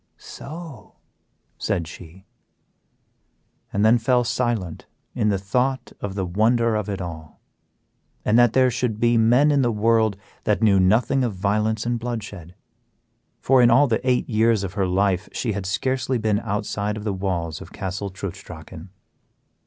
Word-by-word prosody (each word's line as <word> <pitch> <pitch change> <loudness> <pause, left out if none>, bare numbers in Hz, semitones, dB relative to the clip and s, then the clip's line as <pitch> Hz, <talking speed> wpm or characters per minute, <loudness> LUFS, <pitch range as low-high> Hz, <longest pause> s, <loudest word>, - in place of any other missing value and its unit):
"So!" 155 -5 -10 0.6
said 85 -2 -1
she. 90 +3 -12 1.5
And 100 +2 +1
then 115 +2 +5
fell 125 +1 +2
silent 115 -8 -2 0.3
in 105 - +1
the 100 - +1
thought 125 +7 -1
of 100 -1 -4
the 95 -2 -1
wonder 110 +5 +2
of 105 -1 -2
it 100 -1 -3
all, 80 -4 -8 0.9
and 105 - +2
that 120 -2 +5
there 130 -1 +4
should 120 -2 -2
be 120 0 +3
men 120 +6 +4
in 140 -1 +3
the 120 -2 +2
world 110 -1 +2 0.3
that 105 +1 +1
knew 100 -3 +5
nothing 115 +8 +3
of 115 -5 -2
violence 105 +3 0
and 120 0 -1
bloodshed; 105 -7 -6 0.9
for 130 -1 +4
in 120 - +6
all 130 +5 +6
the 115 -5 0
eight 125 -1 +1
years 110 -2 +2
of 95 -1 -5
her 100 -3 0
life 95 +1 0
she 115 - -2
had 100 -2 -4
scarcely 130 +5 -1
been 110 -2 +1
outside 105 -1 -3
of 105 - -7
the 105 -2 -1
walls 90 -5 -3
of - - -11
Castle 95 +1 -4
Trutz 95 -1 -7
Drachen. 80 +1 -11
110 Hz, 160 wpm, -23 LUFS, 95-120 Hz, 1.5 s, in